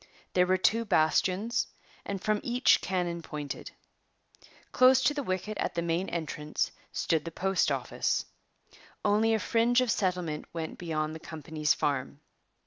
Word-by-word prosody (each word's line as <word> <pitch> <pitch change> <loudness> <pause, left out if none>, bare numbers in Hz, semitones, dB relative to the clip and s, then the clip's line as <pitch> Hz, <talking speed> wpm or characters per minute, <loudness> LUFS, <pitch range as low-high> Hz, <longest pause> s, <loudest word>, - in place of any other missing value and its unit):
There 180 0 +4
were 185 0 +3
two 225 +6 +2
bastions, 195 +5 +2 0.4
and 200 -1 -3
from 210 +2 0
each 245 +1 +3
cannon 175 -2 -2
pointed. 150 -3 -6 1.0
Close 255 +1 +6
to 295 - +3
the 290 - -2
wicket 210 -1 -3
at - - -1
the 170 - 0
main 170 +3 -1
entrance 155 -2 -2 0.2
stood 160 -3 0
the 165 - -5
postoffice. 190 +3 0 0.8
Only 215 +2 +3
a - - 0
fringe 235 +3 +3
of 250 -3 +2
settlement 180 -7 -1
went 165 -1 -5
beyond 155 -2 -2
the 160 - -7
company's 155 -1 -1
farm. 140 0 -2
180 Hz, 140 wpm, -29 LUFS, 160-215 Hz, 1.0 s, Close